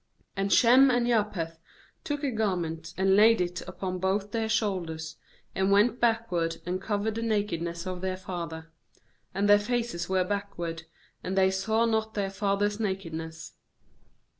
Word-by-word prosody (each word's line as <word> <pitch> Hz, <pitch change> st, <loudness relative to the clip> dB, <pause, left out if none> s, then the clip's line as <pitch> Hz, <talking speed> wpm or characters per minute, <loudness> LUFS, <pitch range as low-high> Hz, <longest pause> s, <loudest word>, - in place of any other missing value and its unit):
KAnd 195 Hz, 0 st, -1 dB
Shem 255 Hz, +3 st, +6 dB
and 245 Hz, -1 st, +2 dB
Japheth 205 Hz, -8 st, -1 dB, 0.4 s
took 290 Hz, 0 st, -3 dB
a 275 Hz, -, 0 dB
garment, 175 Hz, -7 st, -2 dB
and 190 Hz, 0 st, +3 dB
laid 220 Hz, +2 st, +6 dB
it 180 Hz, 0 st, -2 dB
upon 185 Hz, -1 st, -4 dB
both 195 Hz, +2 st, -1 dB
their 225 Hz, -1 st, -1 dB
shoulders, 170 Hz, -8 st, -2 dB, 0.4 s
and 190 Hz, +1 st, +1 dB
went 210 Hz, +4 st, +4 dB
backward, 225 Hz, -8 st, +1 dB
and 180 Hz, +1 st, -2 dB
covered 210 Hz, +1 st, -1 dB
the 225 Hz, -, -4 dB
nakedness 170 Hz, -6 st, -2 dB
of 185 Hz, -1 st, -4 dB
then: 185 Hz, 0 st, -2 dB
father; 165 Hz, -4 st, -6 dB, 0.6 s
and 200 Hz, +1 st, +1 dB
their 205 Hz, 0 st, +7 dB
faces 230 Hz, -6 st, -2 dB
were 190 Hz, -1 st, +2 dB
backward, 180 Hz, -4 st, -4 dB, 0.4 s
and 190 Hz, +1 st, -3 dB
they 190 Hz, 0 st, +4 dB
saw 220 Hz, +4 st, +1 dB
not 220 Hz, -1 st, -1 dB
their 195 Hz, -2 st, -1 dB
father's 205 Hz, +1 st, 0 dB
nakedness. 165 Hz, -6 st, -4 dB
195 Hz, 150 wpm, -28 LUFS, 175-220 Hz, 0.6 s, their